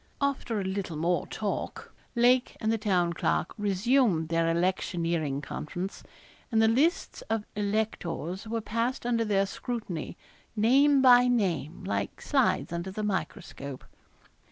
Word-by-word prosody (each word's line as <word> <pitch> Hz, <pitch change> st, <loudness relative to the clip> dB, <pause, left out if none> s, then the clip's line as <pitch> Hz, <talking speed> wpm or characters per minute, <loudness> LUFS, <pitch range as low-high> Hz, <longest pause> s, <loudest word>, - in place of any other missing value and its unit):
After 275 Hz, -6 st, -1 dB
a -, -, -2 dB
little 190 Hz, -4 st, -3 dB
more 170 Hz, +3 st, 0 dB
talk, 210 Hz, -2 st, -4 dB, 0.2 s
Lake 245 Hz, +1 st, +3 dB
and 220 Hz, -, 0 dB
the 225 Hz, -, 0 dB
Town 180 Hz, -5 st, +1 dB
Clerk -, -, 0 dB
resumed 205 Hz, -, +2 dB
their 165 Hz, 0 st, +2 dB
electioneering 170 Hz, -4 st, 0 dB
conference, 175 Hz, +7 st, -5 dB, 0.5 s
and 225 Hz, -, +3 dB
the 220 Hz, -, +5 dB
lists 280 Hz, +10 st, +1 dB
of 220 Hz, -1 st, -1 dB
electors 200 Hz, -3 st, -2 dB
were 225 Hz, +1 st, -2 dB
passed 230 Hz, +4 st, -2 dB
under 235 Hz, -1 st, +1 dB
their 200 Hz, -2 st, +2 dB
scrutiny, 195 Hz, -, -5 dB, 0.4 s
name 270 Hz, +6 st, +4 dB
by 250 Hz, -1 st, +7 dB
name, 185 Hz, -, 0 dB
like 190 Hz, -, -3 dB
slides 265 Hz, -, +1 dB
under 170 Hz, +2 st, -3 dB
the 210 Hz, +3 st, -4 dB
miscroscope. 140 Hz, -8 st, -4 dB
205 Hz, 130 wpm, -28 LUFS, 175-235 Hz, 0.5 s, by